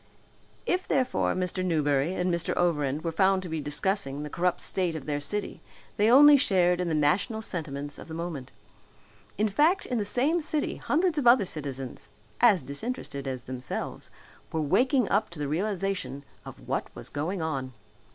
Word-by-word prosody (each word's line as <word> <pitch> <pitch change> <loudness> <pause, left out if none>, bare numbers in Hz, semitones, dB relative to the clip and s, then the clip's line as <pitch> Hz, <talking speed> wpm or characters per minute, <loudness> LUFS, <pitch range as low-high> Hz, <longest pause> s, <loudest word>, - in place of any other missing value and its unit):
If 365 +1 0
therefore 260 -2 +1
Mr. 185 0 -2
Newberry 150 -1 +1
and 180 -1 0
Mr. 170 -1 -1
Overend 150 -4 +1
were 165 - -1
found 190 +2 +2
to 180 - -6
be 160 -1 -3
discussing 150 0 -1
the 150 - -7
corrupt 180 0 0
state 180 -4 -1
of 155 - -6
their 145 -1 -1
city 205 +8 -3 0.4
they 210 +2 +4
only 290 +4 +9
shared 180 -8 +2
in 180 - -1
the 160 - 0
national 200 +10 +1
sentiments 145 -6 -4
of - - -10
the 160 - -7
moment. 160 -6 -5 0.9
In 215 +2 +2
fact 305 - +2
in 245 -2 -1
the - - 0
same 280 +11 +1
city 300 -1 -2
hundreds 330 0 +1
of 255 - +1
other 240 -4 +6
citizens, 135 -6 -4 0.3
as 215 -8 +5
disinterested 140 - -5
as 130 -2 -4
themselves, 130 0 -6 0.4
were 160 - -1
waking 250 - +2
up 205 +2 +1
to 170 - -12
the 145 -1 -2
realization 185 -3 -2 0.2
of - - -11
what - - -2
was - - -7
going 165 +5 -3
on. 135 -5 -3
175 Hz, 175 wpm, -27 LUFS, 145-215 Hz, 0.9 s, only